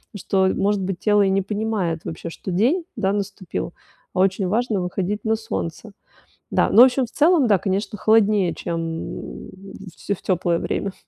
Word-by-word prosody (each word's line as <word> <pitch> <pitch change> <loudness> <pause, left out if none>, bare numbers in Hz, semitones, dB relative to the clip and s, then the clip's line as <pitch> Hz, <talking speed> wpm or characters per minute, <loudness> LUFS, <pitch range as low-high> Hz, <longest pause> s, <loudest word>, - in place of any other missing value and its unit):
что, 190 -1 +1
э - - +1
может 200 0 +1
быть, 190 -1 -3
тело 210 -1 +3
и 195 - +3
не 195 0 +1
понимает 205 -6 -2
вообще, 165 +1 -6
что 190 - -8
день, 250 - +2
да, 195 +1 0
наступил. 195 -4 -4 0.4
А 185 - -2
очень 190 0 +1
важно 215 -1 0
выходить 190 +3 -3
на 220 0 +2
солнце. 95 - -5 0.6
Да. - - +2
Ну, 230 - +8
в - - +10
общем 260 +1 +1
и - - -3
целом, 300 +2 +3
да, 205 -3 +5
конечно, 195 +3 -2
холоднее, 210 -4 +3
чем 170 - -4
м 165 0 -6 0.4
в - - -24
те 200 - -2
в - - -19
теплое 175 -2 0
время. 195 -1 -3
195 Hz, 190 wpm, -22 LUFS, 185-215 Hz, 0.6 s, в